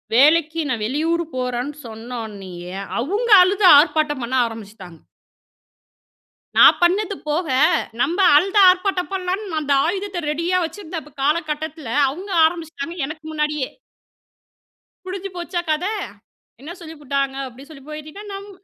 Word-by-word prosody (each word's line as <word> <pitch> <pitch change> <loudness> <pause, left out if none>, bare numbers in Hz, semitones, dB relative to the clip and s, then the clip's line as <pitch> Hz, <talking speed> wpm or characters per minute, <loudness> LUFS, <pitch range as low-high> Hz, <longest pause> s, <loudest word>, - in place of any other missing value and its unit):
வேலைக்கு 315 +4 +4
நான் 240 -4 -2
வெளியூரு 325 +7 -1
போறன்னு 250 +3 -3
சொன்னோனயே, 210 -6 -8 0.3
அவுங்க 410 - -2
அழுது 390 +2 +1
ஆர்ப்பாட்டம் 295 -2 +2
பண்ண 240 +2 -5
ஆரம்பிச்சுட்டாங்க. 205 -6 -10 1.6
நான் - - +8
பண்ணது 395 +3 +2
போக, 315 +3 -1 0.5
நம்ப 340 +9 0 0.2
அழுது 390 +6 +3
ஆர்ப்பாட்டம் 370 0 0
பண்ணலான் 375 +2 -2 0.2
அந்த 285 -2 0
ஆயுதத்த 380 0 -3
ரெடியா 335 +4 0
வச்சுருந்த 330 0 -6 0.2
காலகட்டத்துல, 310 -1 -2 0.2
அவுங்க 370 +8 -8
ஆரம்பிச்சுட்டாங்க. 335 0 -4
எனக்கு 310 +2 -8
முன்னாடியே! 300 -3 -2 1.4
முடிஞ்சு 385 +1 -5
போச்சா 345 0 -3
கத. 310 +4 -1 0.8
என்ன 310 +4 -8
சொல்லி 320 -1 -9
புட்டாங்க 275 -1 -1
அப்டின் 265 +4 -14
சொல்லி 275 -4 -13
போய்விட்டீங்கன்னா 310 +7 -9
நம்ம 400 +1 -8
315 Hz, 115 wpm, -21 LUFS, 275-360 Hz, 1.6 s, நான்